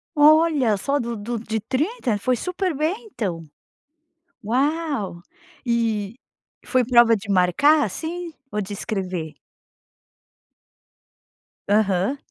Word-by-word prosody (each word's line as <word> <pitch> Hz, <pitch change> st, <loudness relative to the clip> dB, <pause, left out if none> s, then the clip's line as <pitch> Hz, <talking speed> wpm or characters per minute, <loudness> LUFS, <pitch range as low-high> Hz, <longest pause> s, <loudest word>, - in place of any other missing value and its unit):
Olha, 300 Hz, -6 st, +5 dB
só 280 Hz, +8 st, 0 dB
do 235 Hz, -1 st, -3 dB
do 230 Hz, +3 st, -4 dB
de 220 Hz, 0 st, -3 dB
30? 260 Hz, -, -1 dB
Foi 255 Hz, +5 st, +1 dB
super 360 Hz, -, -2 dB
bem 355 Hz, -, -2 dB
então. 180 Hz, -, -3 dB, 1.0 s
Uau! 270 Hz, -, -1 dB, 0.4 s
E, 230 Hz, -2 st, -1 dB, 0.5 s
foi 255 Hz, -2 st, +2 dB
prova 235 Hz, -1 st, +6 dB
de 205 Hz, -1 st, -8 dB
marcar, 200 Hz, -, +4 dB
assim, 335 Hz, -, -5 dB, 0.2 s
ou 210 Hz, -, -1 dB
de 200 Hz, +1 st, -7 dB
escrever? 185 Hz, -6 st, -4 dB, 2.4 s
Aham. 205 Hz, +3 st, +2 dB
235 Hz, 100 wpm, -22 LUFS, 205-300 Hz, 2.4 s, prova